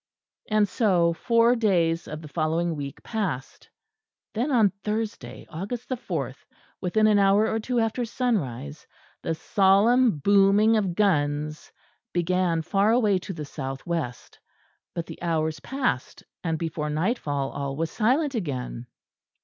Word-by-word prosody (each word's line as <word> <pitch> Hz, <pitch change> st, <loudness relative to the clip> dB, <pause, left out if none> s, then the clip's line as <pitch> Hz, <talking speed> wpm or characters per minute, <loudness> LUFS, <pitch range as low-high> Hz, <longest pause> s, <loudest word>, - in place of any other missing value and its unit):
And 215 Hz, -1 st, +3 dB
so 180 Hz, -6 st, +2 dB
four 230 Hz, +6 st, +3 dB
days 175 Hz, -7 st, +1 dB
of 155 Hz, +1 st, -7 dB
the -, -, -8 dB
following 165 Hz, +2 st, 0 dB
week 140 Hz, -2 st, -7 dB
passed; 190 Hz, -, -4 dB, 0.6 s
then 245 Hz, +7 st, -1 dB
on 220 Hz, -6 st, +4 dB
Thursday, 215 Hz, +1 st, -4 dB
August 200 Hz, +9 st, -6 dB
the 255 Hz, -, 0 dB
fourth, 155 Hz, -, -5 dB, 0.4 s
within 215 Hz, +4 st, +2 dB
an 210 Hz, -1 st, +5 dB
hour 200 Hz, +2 st, +4 dB
or 225 Hz, -, 0 dB
two 245 Hz, +2 st, -1 dB
after 225 Hz, +2 st, 0 dB
sunrise, 150 Hz, -, -2 dB, 0.3 s
the 165 Hz, -, -2 dB
solemn 205 Hz, +5 st, +4 dB
booming 200 Hz, +6 st, +4 dB
of 195 Hz, -5 st, 0 dB
guns 150 Hz, -6 st, 0 dB, 0.4 s
began 175 Hz, -1 st, +1 dB
far 195 Hz, +5 st, +2 dB
away 215 Hz, -5 st, +3 dB
to 185 Hz, -, -7 dB
the 155 Hz, -5 st, -6 dB
south 135 Hz, -1 st, -6 dB
west; 160 Hz, -8 st, -4 dB, 0.6 s
but 170 Hz, -, -3 dB
the -, -, -10 dB
hours 160 Hz, -2 st, -1 dB
passed; 260 Hz, -, -2 dB, 0.2 s
and 165 Hz, -2 st, -1 dB
before 155 Hz, -2 st, -3 dB
nightfall 150 Hz, -, -1 dB
all 140 Hz, -1 st, -4 dB
was 165 Hz, +2 st, -2 dB
silent 265 Hz, +6 st, +1 dB
again. 130 Hz, -, -4 dB
180 Hz, 140 wpm, -25 LUFS, 155-220 Hz, 0.6 s, an